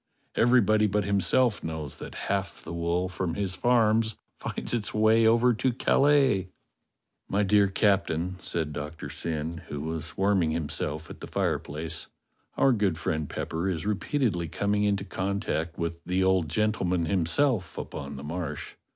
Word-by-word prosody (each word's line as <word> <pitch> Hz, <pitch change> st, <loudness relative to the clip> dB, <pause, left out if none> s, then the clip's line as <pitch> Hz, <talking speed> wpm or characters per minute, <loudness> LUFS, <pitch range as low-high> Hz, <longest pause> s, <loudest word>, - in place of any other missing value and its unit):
Everybody 110 Hz, -3 st, +4 dB
but 105 Hz, +1 st, +1 dB
himself 100 Hz, +4 st, +2 dB
knows 80 Hz, -3 st, -5 dB
that -, -, -8 dB
half 100 Hz, -2 st, -2 dB
the -, -, -7 dB
wool 85 Hz, +2 st, 0 dB
from 90 Hz, -2 st, -3 dB
his 100 Hz, -2 st, -1 dB
farms 110 Hz, -1 st, +3 dB, 0.2 s
finds -, -, -5 dB
its 110 Hz, -3 st, -1 dB
way 110 Hz, +1 st, +5 dB
over 120 Hz, +2 st, +5 dB
to 125 Hz, +3 st, +1 dB
Calais." 135 Hz, -6 st, +3 dB, 0.8 s
"My 100 Hz, +1 st, +2 dB
dear 100 Hz, 0 st, +4 dB
Captain," 95 Hz, -3 st, +1 dB
said 80 Hz, -4 st, -2 dB
Doctor 75 Hz, +2 st, -6 dB
Syn, 80 Hz, 0 st, -3 dB
who 75 Hz, -, -5 dB
was 80 Hz, +1 st, -5 dB
warm 100 Hz, 0 st, +3 dB
ing 80 Hz, -, +1 dB
himself 80 Hz, -1 st, -3 dB
at -, -, -10 dB
the -, -, -8 dB
fireplace, 80 Hz, +2 st, -2 dB, 0.5 s
"our 135 Hz, -, +5 dB
good 100 Hz, -8 st, +1 dB
friend 80 Hz, -3 st, -2 dB
Pepper 85 Hz, +4 st, -2 dB
is 85 Hz, -2 st, -2 dB
repeatedly 105 Hz, -, 0 dB
coming 105 Hz, +5 st, 0 dB
into 100 Hz, -1 st, +1 dB
contact 95 Hz, -5 st, -2 dB
with 85 Hz, 0 st, -3 dB
the 90 Hz, +1 st, 0 dB
old 95 Hz, -4 st, +2 dB
gentleman 90 Hz, -2 st, +1 dB
himself 95 Hz, -, +1 dB
upon 70 Hz, 0 st, -6 dB
the 70 Hz, -, -8 dB
Marsh. 80 Hz, -1 st, -5 dB
95 Hz, 150 wpm, -27 LUFS, 80-105 Hz, 0.8 s, way